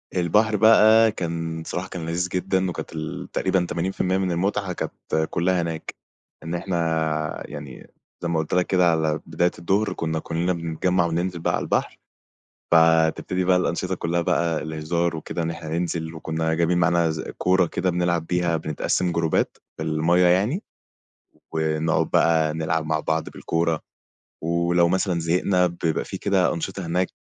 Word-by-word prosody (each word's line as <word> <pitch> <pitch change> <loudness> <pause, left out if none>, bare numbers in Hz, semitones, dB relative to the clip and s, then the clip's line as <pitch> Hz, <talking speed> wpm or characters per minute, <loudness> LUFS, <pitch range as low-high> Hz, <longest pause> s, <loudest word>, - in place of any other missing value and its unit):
البحر 105 +5 +2
بقى 110 +1 +6
كان 80 -3 -4
صراحة 90 - -4
كان 85 -3 -6
لذيذ 85 +2 -1
جدًا 95 +1 0
وكانت 85 - -6
ال 80 -1 -5
تقريبًا 95 -2 +1
80% 95 +1 -1
من 95 -1 0
المتعة 95 +2 -1
كانت 80 -2 -3
كُلّها 90 +1 +1
هناك. 85 -1 -5 0.5
إن 80 +2 -3
إحنا 80 -3 -1
يعني 70 -3 -9 0.3
زي 85 - -2
ما 85 -1 +1
قُلت 80 - -3
لَك 90 0 +2
كده 90 -2 +4
على 80 -1 0
بداية 85 +2 +1
الضُهر 100 +5 +1
كنا 80 -1 -2
كُلّنا 85 +3 -1
بنتجمع 85 +2 0
وننزل 85 +1 -2
بقى - - 0
على - - -2
البحر، - - -1 0.7
فتبتدي 80 +2 +3
بقى 90 0 +4
الأنشطة 90 +1 -1
كلّها 85 0 -1
بقى 85 -1 0
الهزار 80 +2 -1
وكده 80 +2 -4
إن 80 - -1
إحنا 80 -1 -7
ننزل 80 0 -2
وكنا 80 0 -2
جايبين 85 +2 +2
معانا 85 -1 +3
ز 80 0 -3 0.2
كورة 90 0 +3
كده 90 +2 -1
بنلعَب 85 -2 0
بيها، 90 -2 +1
بنتقسم 80 +3 -1
جروبات 85 -1 0 0.2
في 80 - -4
المَيّة 80 +3 +2
يعني 105 - +2 0.9
ونقعُد 80 0 0
بقى 80 -2 +3
نلعَب 80 0 -1
مع 80 0 0
بعض 80 +1 -1
بالكورة. 85 -1 -1 0.6
ولو 85 +1 +2
مثلًا 95 -1 +1
زهقنا 90 +2 +2
بيبقى 85 -2 -2
في - - -6
كده 95 -2 +2
أنشطة 95 +2 -4
هناك، 90 +2 0
85 Hz, 155 wpm, -23 LUFS, 80-90 Hz, 0.9 s, بقى